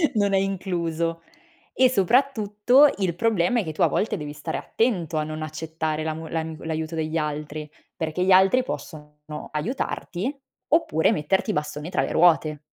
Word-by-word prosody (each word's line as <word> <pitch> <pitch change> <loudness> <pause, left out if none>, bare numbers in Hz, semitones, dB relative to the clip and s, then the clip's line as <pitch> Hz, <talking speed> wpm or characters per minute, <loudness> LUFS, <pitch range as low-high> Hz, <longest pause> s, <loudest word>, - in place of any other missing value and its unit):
non 200 -1 +2
è 195 - +4
incluso. 170 -4 -2 0.5
E 255 -1 +5
soprattutto 245 +3 +4
il 185 -4 -1
problema 225 +2 +2
è - - 0
che 160 - -4
tu 155 - -6
a - - +6
volte 215 - -1
devi 150 -1 -6
stare 150 +2 -4
attento 185 - -1
a 155 - +1
non 155 0 -5
accettare 155 0 -3
l'amo 160 +1 -4
l'ami 160 -1 -4
l'aiuto 160 0 -3
degli 160 0 -2
altri, 150 0 -3 0.3
perché 160 +2 -2
gli 190 - +3
altri 190 +7 +6
possono 150 -9 -8 0.3
aiutarti, 225 - -3 0.3
oppure 260 - +3
metterti 190 +8 0
i - - -3
bastoni 150 +1 -3
tra - - 0
le - - -2
ruote. 160 -3 +3
165 Hz, 165 wpm, -24 LUFS, 155-200 Hz, 0.5 s, a